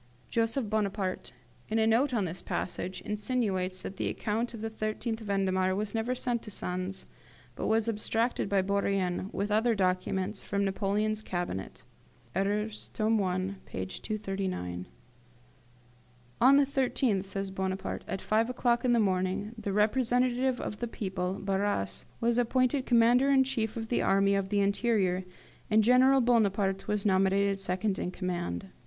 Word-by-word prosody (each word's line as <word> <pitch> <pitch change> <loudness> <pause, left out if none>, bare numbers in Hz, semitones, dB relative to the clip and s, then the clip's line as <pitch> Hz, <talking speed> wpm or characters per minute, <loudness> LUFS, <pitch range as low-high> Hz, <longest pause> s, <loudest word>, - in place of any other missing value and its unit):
[Joseph 230 +1 +1
Bonaparte, 200 -3 -2 0.4
in 220 - 0
a 220 - +3
note 235 +5 +3
on 220 -6 +1
this 175 +1 -5
passage, 185 +1 -4
insinuates 205 -4 -1
that 190 - -6
the - - -1
account 230 +3 -2
of 220 - -8
the 225 - -2
13th 220 +1 -3
Vendemiaire 190 -3 +1
was 205 +1 -3
never 230 +3 -1
sent 245 -2 -1
to - - -9
Sens, 185 0 -4 0.5
but - - -3
was 220 0 +2
abstracted 225 0 0
by 195 -1 +2
Bourrienne, 195 -1 0
with 205 +1 -2
other 225 +2 +3
documents, 190 +1 0
from 200 0 -1
Napoleon's 210 +2 0
Cabinet 175 - -4 0.5
(Erreurs, 210 +2 -1
tome 220 -1 +2
i. 185 +1 -1
p. 95 - -4
239).] 185 - -4 1.5
"On 270 +3 +7
the 285 - +5
13th," 255 -7 0
says 195 0 -4
Bonaparte, 190 0 -3
"at 190 - -4
five 225 +2 +2
o'clock 240 -1 +1
in 250 -1 +3
the 235 - +4
morning, 190 +1 0
the 210 -3 -4
representative 245 +4 +2
of 210 - -5
the 240 - -2
people, 190 -4 -3
Barras, 195 - -1
was 235 +1 +2
appointed 255 +3 +1
Commander 240 +3 +5
in 270 -1 +5
chief 235 -5 -2
of 225 -1 -5
the 245 - +1
Army 195 +1 +3
of 195 -1 0
the 205 0 +2
Interior, 200 -3 +1 0.4
and 220 0 +4
General 260 +3 +5
Bonaparte 200 -5 +2
was 210 -1 -1
nominated 195 0 +3
second 190 +1 -1
in - - -2
command. 175 - -3
205 Hz, 150 wpm, -30 LUFS, 190-230 Hz, 1.5 s, On